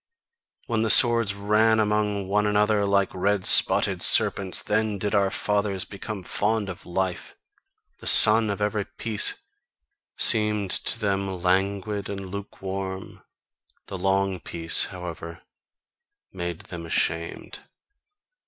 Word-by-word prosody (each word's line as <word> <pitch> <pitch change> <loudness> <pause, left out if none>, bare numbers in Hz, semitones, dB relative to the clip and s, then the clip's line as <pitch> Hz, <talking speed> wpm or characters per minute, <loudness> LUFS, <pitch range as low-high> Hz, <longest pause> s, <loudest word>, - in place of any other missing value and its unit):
When 115 -2 -2
the 110 - -1
swords 115 -4 +4
ran 105 +2 +1
among 105 -2 -2
one 105 +2 0
another 105 0 0
like 100 -1 0
red 95 +1 -2
spotted - - +4
serpents, 95 -2 +4
then 110 0 -2
did 105 +2 -4
our 100 -2 +1
fathers 100 -2 -2
become 100 -1 -8
fond 105 +2 -2
of 90 - -11
life; 90 0 -4 0.6
the - - -8
sun 110 0 +8
of 100 +1 -4
every 105 -1 -2
peace 110 -3 -3 0.8
seemed 105 -3 +1
to - - 0
them 100 -3 -2 0.2
languid 100 +2 -2
and 95 -2 -8
lukewarm, 95 -1 -8 0.6
the 95 - -8
long 95 0 -1
peace, 80 -1 -1
however, 85 -2 -10 0.9
made 85 -2 -6
them 85 -2 -10
ashamed. 80 0 -4
100 Hz, 120 wpm, -23 LUFS, 95-105 Hz, 0.9 s, sun